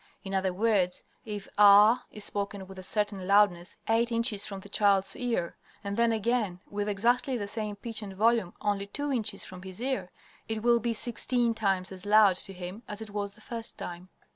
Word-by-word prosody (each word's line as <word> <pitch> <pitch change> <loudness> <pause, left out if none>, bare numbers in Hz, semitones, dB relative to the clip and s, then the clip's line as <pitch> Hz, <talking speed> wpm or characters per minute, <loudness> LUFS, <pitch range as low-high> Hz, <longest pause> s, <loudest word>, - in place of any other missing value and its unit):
In 195 - -6
other 190 -1 +1
words, 190 -2 +1 0.2
if 205 -3 -6
"ah" 210 +4 +7
is 210 -1 -8
spoken 200 -1 -4
with 190 0 -11
a - - -6
certain 200 -1 -2
loudness 195 -3 +3
eight 230 +2 +2
inches 230 -3 +1
from 195 -2 -6
the 205 - -11
child's 200 -1 +2
ear, 235 -9 -2 0.3
and 200 0 -3
then 235 +1 +3
again 220 -4 0
with 205 0 -2
exactly 245 +6 +1
the 205 -3 -4
same 210 0 -4
pitch 225 +2 -4
and 195 -2 -7
volume 220 -2 +2
only 200 -1 -1
two 285 +7 -3
inches 225 -4 -1
from 185 -1 -10
his 185 +1 -8
ear, 260 -6 -2 0.4
it 220 -1 -3
will 240 0 +4
be 230 0 -1
sixteen 240 +1 0
times 195 -4 0
as 185 -1 -9
loud 205 -3 +5
to 195 - -4
him 185 +3 -7
as 210 - -6
it 220 -2 -8
was 200 -1 -4
the - - -17
first 230 0 -5
time. 175 +1 -7
205 Hz, 200 wpm, -29 LUFS, 195-230 Hz, 0.4 s, ah